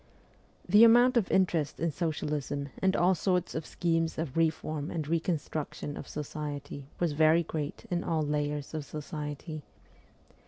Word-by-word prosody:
The 205 +5 +7
amount 240 +3 +7
of 230 -6 +2
interest 170 -6 +1
in 165 0 0
socialism 145 -3 -2
and 190 0 +3
all 180 +2 +4
sorts 180 0 0
of 160 -1 -4
schemes 165 -1 0
of 160 -5 -3
reform 155 -2 0
and 160 -4 -3
reconstruction 155 -3 -2
of - - -7
society 145 -2 -5
was 175 -3 +1
very 155 +3 +4
great 155 +4 -5
in 175 0 0
all 160 -2 0
layers 150 0 -2
of 155 -1 -3
society. 150 +1 -6
155 Hz, 145 wpm, -30 LUFS, 150-170 Hz, -, The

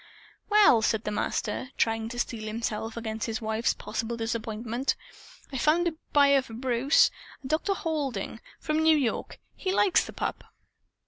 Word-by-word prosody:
"Well," 410 - +6
said 220 0 +1
the 210 - -2
Master, 210 +3 -2
trying 225 0 +1
to 245 - -7
steel 230 -2 -3
himself 225 0 -3
against 220 -1 -3
his 225 +1 -2
wife's 220 0 0
possible 225 +2 -4
disappointment, 230 +2 -2 0.6
"I 265 - -2
found 330 +6 +3
a 335 - 0 0.2
buyer 280 -1 +5
for 230 -3 -11
Bruce 255 +3 +3 0.3
a - - -6
Dr. 320 +7 0
Halding, 295 -9 -3 0.2
from 305 0 0
New 315 0 +5
York. 255 -6 -2 0.2
He 375 - -2
likes 385 0 +4
the - - -9
pup. - - -3
235 Hz, 155 wpm, -28 LUFS, 225-295 Hz, 0.6 s, Well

